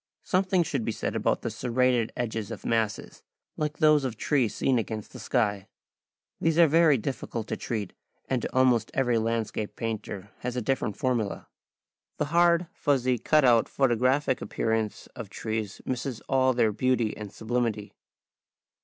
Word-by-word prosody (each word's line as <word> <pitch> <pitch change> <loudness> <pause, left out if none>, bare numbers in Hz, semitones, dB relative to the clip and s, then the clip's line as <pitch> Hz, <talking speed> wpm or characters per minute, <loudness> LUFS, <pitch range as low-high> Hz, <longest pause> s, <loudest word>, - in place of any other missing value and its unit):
Something 185 -1 +2
should 140 -7 -2
be 115 - -1
said - - -3
about - - 0
the - - -2
serrated 125 -2 +1
edges 110 -3 -3
of - - -8
masses, 110 -2 -1 0.3
like 150 -1 -2
those 155 -2 +5
of 125 -4 -3
trees 130 -5 +1
seen 130 -3 +2
against 110 -1 -5
the - - -9
sky. 105 -6 0 0.7
These 165 0 +1
are 170 - +8
very 160 -2 +5
difficult 115 -1 -4
to - - -1
treat, 105 -5 -4 0.3
and 130 -3 -1
almost 125 -3 +2
every 125 -3 +2
landscape 110 -2 -2
painter 105 -3 -5
has 125 0 -4
a - - 0
different 120 -5 -1
formula. 120 -6 -1 0.7
The 150 - 0
hard, 170 0 +4
fussy, 130 -4 +1
cut 150 +4 +3
out, 120 -3 +4
photographic 130 +1 +2
appearance 110 -1 -2
of - - -7
trees 110 -3 -4
misses 125 -1 -3
all 130 -1 +2
their 115 -3 +2
beauty 120 0 0
and 105 -2 -8
sublimity. 110 -2 -2
120 Hz, 155 wpm, -27 LUFS, 110-135 Hz, 0.7 s, are